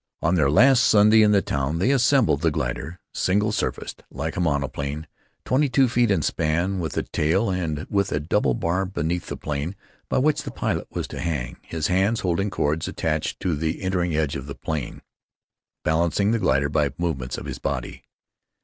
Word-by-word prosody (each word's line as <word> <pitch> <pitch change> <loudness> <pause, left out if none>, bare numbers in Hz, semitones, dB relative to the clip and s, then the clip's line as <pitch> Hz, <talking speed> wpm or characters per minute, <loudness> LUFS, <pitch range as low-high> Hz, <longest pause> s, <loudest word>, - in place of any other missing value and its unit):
On 80 - +2
their 75 -6 +3
last 125 - +6
Sunday 105 +1 +6
in 105 - +5
the 100 -2 +3
town 70 +4 -1
they 95 +10 +2
assembled 130 - +3
the 80 - +3
glider, 80 +3 -3
single 105 +3 +1
surfaced, 105 - -3
like 80 +4 -4
a - - -3
monoplane, 70 -1 -2 0.4
twenty 140 +2 +2
two 130 +1 +4
feet 120 -1 +2
in 95 -7 +2
span, 85 +7 0
with 80 -4 -4
a - - +1
tail, 95 +7 0
and 80 -5 -2
with 100 -1 0
a 75 - 0
double 75 -4 +1
bar 85 +8 0
beneath 85 -1 -2
the - - -5
plane, 75 +5 -3 0.3
by - - +1
which 150 +3 +2
the - - -6
pilot - - -2
was - - -4
to - - -7
hang, 75 -8 -3
his 80 -2 -4
hands 95 +5 +2
holding 95 +3 0
cords 80 -3 -1
attached 80 -1 -2
to 90 -4 0
the 80 +5 -2
entering 90 -3 0
edge 75 -3 0
of 70 +1 -6
the 70 - -6
plane, 75 -6 -5 0.8
balancing 85 +6 +1
the 115 - +1
glider 70 -6 +2
by 75 -1 +1
movements 70 -8 -2
of - - -7
his - - -6
body. 65 -3 -4
85 Hz, 190 wpm, -24 LUFS, 75-100 Hz, 0.8 s, last